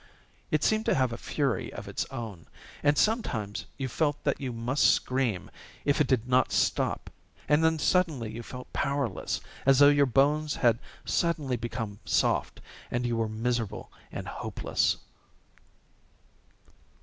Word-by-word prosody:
It 155 -1 +1
seemed 220 0 +2
to - - +4
have 130 -4 +1
a - - -3
fury 135 +1 -1
of 100 0 -8
its 100 - -3
own. 110 -10 -7 0.3
And 145 0 +3
sometimes 120 - 0
you 135 -2 -2
felt 145 +3 0
that - - 0
you 130 -2 -2
must 120 +4 0
scream 125 -8 -1 0.3
if 145 +1 +3
it 145 - +3
did 125 -2 +1
not 130 0 +3
stop, - - 0 0.4
and 150 +2 +4
then 160 0 +3
suddenly 155 -9 +1
you 115 - -6
felt 125 +2 -9
powerless, 140 -7 -1 0.2
as 135 0 +5
though 145 +1 +8
your 145 -1 +4
bones 145 +4 +2
had 120 -2 +3 0.3
suddenly 155 -7 0
become 115 -3 -4
soft; - - +1 0.3
and 120 0 -1
you 120 -1 0
were 115 -1 0
miserable 115 0 -2 0.2
and - - -6
hopeless. - - -1
130 Hz, 150 wpm, -28 LUFS, 115-145 Hz, 0.4 s, though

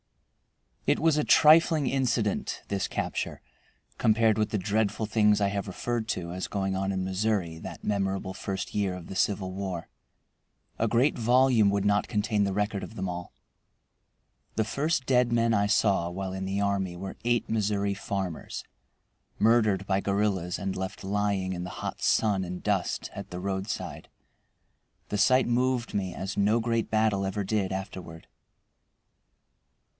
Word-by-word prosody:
It - - +4
was 160 -2 +3
a 150 - +2
trifling 155 -1 +6
incident, 125 -6 0
this 100 -1 -1
capture, - - -3 0.6
compared 110 -1 +3
with 105 - +1
the 110 - -1
dreadful 105 +3 0
things 105 -1 +3
I 100 -1 +2
have 100 0 -3
referred 115 +4 -3
to 85 -4 -2
as 95 - -3
going 95 -1 -1
on 95 +1 -1
in 95 -1 -1
Missouri 95 -4 -1
that - - -8
memorable 95 -2 -1
first 95 0 -4
year 100 -3 0
of 90 -2 -9
the 95 - -8
Civil 95 -1 0
War. 95 -3 -4 0.9
A 115 - +2
great 120 +5 +2
volume 120 -2 +4
would 100 0 0
not 100 0 +2
contain 105 -1 +1
the 100 - -1
record 105 0 -1
of - - -8
them 95 -2 -3
all. 90 0 -5 1.2
The 110 - +2
first 140 +5 -1
dead 125 -2 +3
men 115 -1 +2
I 100 -1 +2
saw 100 -4 +2
while 95 +1 -4
in 95 0 -4
the 95 +1 -1
army 100 -3 0
were 95 +1 -6
eight 120 0 +1
Missouri 100 -2 0
farmers 95 -4 -4 0.7
murdered 110 -4 +3
by 95 0 +1
guerrillas 100 -3 0
and 95 -1 -3
left 95 +1 -5
lying 100 -1 0
in 90 -1 -4
the 90 - -5 0.2
hot - - -4
sun 100 -4 +2
and 90 0 -6
dust - - -1
at - - -7
the 90 - -6
roadside. 95 +2 -4 1.0
The 105 - -1
sight 130 +5 +4
moved 125 0 0
me 95 -3 -2
as 95 +1 -4
no 105 +3 +3
great 115 0 0
battle 110 -3 +2
ever 95 +1 -2
did 100 -1 -1
afterward. 95 -4 -6
100 Hz, 160 wpm, -28 LUFS, 95-110 Hz, 1.2 s, trifling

